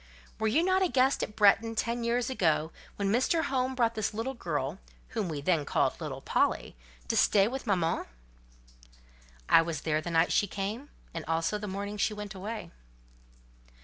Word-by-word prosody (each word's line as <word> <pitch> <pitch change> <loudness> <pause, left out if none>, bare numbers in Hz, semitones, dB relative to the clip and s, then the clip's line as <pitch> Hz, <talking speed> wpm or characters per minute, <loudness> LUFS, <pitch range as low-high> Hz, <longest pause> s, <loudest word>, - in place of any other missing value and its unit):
Were 220 - +1
you 295 +10 +3
not 375 +1 +2
a 375 - +4
guest 265 0 +3
at 210 - -4
Bretton 225 +2 +4
ten 235 +1 -1
years 235 +1 +1
ago, 160 -8 +1 0.2
when 200 -1 -1
Mr. 260 +8 +2
Home 260 -1 -1
brought 230 -2 +1
his 215 -1 -2
little 235 +5 -2
girl, 155 - -3 0.3
whom 215 -6 -2
we 150 -3 -4
then 160 0 +2
called - - 0
'little - - -5
Polly,' - - 0 0.3
to - - 0
stay 200 -1 +4
with 260 +1 -5
mamma?" 175 -5 0 1.4
"I - - +7
was 165 -3 -3
there 155 -1 0
the 175 - -5
night 165 0 +3
she 205 - +3
came, 210 +9 -4 0.2
and 165 -1 -4
also 165 +6 0
the 210 - -5
morning 200 +2 -4
she 210 +1 0
went 210 0 -6
away." 210 +4 -6
210 Hz, 180 wpm, -29 LUFS, 170-235 Hz, 1.4 s, I